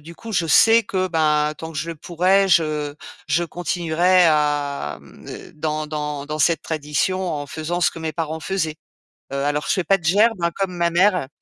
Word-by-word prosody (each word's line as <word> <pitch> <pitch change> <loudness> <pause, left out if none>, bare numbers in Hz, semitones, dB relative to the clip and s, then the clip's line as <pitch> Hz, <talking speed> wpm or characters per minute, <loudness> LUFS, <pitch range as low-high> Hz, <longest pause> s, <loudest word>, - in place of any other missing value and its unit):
du 165 +3 -12
coup, 230 +4 -9
je 175 -4 +1
sais 225 +8 +6
que, 190 -3 -2
bah, 150 -2 +1
tant 160 0 -8
que 155 - -5
je 165 +2 -3
le - - -6
pourrai, 185 +5 +2
je 155 -4 +1 0.3
je 170 +4 +1
continuerai 175 +1 +2
à, 145 - 0
hem, - - -17
d - - -10
dans 155 0 -3
dans 150 -2 -4
dans 155 +1 -4
cette 160 0 +2
tradition, 160 +4 -2
en 145 -1 -4
faisant 160 +4 -4
ce - - +3
que - - -10
mes 160 -1 -3
parents 160 0 -4
faisaient. 160 -4 -2 0.6
Heu, - - -4
alors, 145 +1 -1
je - - +2
fais 185 - 0
pas 195 - +4
de 175 - -20
gerbe, 210 +3 +3
hein, 170 0 +1
comme 190 -2 -2
ma 170 0 +1
mère. 180 -4 +2
160 Hz, 210 wpm, -21 LUFS, 150-180 Hz, 0.6 s, sais